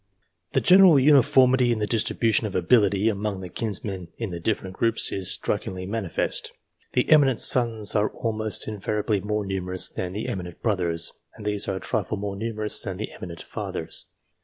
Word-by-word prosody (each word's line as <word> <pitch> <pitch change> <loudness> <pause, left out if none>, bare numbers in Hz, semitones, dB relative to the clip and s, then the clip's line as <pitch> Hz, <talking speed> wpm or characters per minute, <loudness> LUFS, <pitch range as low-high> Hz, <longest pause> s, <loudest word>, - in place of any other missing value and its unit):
The - - +2
general 185 -4 +6
uniformity 130 -2 +4
in 115 - 0
the 105 - -1
distribution 110 0 0
of 100 - -8
ability 100 +2 +2
among 100 -2 -2
the 90 - -8
kinsmen 95 -2 -4
in 115 -5 -5
the 85 - -6
different 95 0 -3
groups, 115 -1 +1
is 95 -2 +1
strikingly 95 0 -2
manifest. 100 -3 -3 0.4
The 125 - +1
eminent 140 -6 +4
sons 115 -4 +5
are 105 0 +2
almost 110 -3 -1
invariably 105 0 -2
more 105 +1 -3
numerous 95 -1 +1
than 90 0 -5
the 105 - -5
eminent 90 -3 -7
brothers, 90 -6 -1 0.2
and 105 - -12
these 105 -1 0
are 95 - -2
a - - -4
trifle 105 - -3
more 100 0 -5
numerous 110 0 -2
than 95 -3 -6
the 110 - -6
eminent 85 -2 -9
fathers. - - -3
105 Hz, 170 wpm, -24 LUFS, 95-115 Hz, 0.4 s, general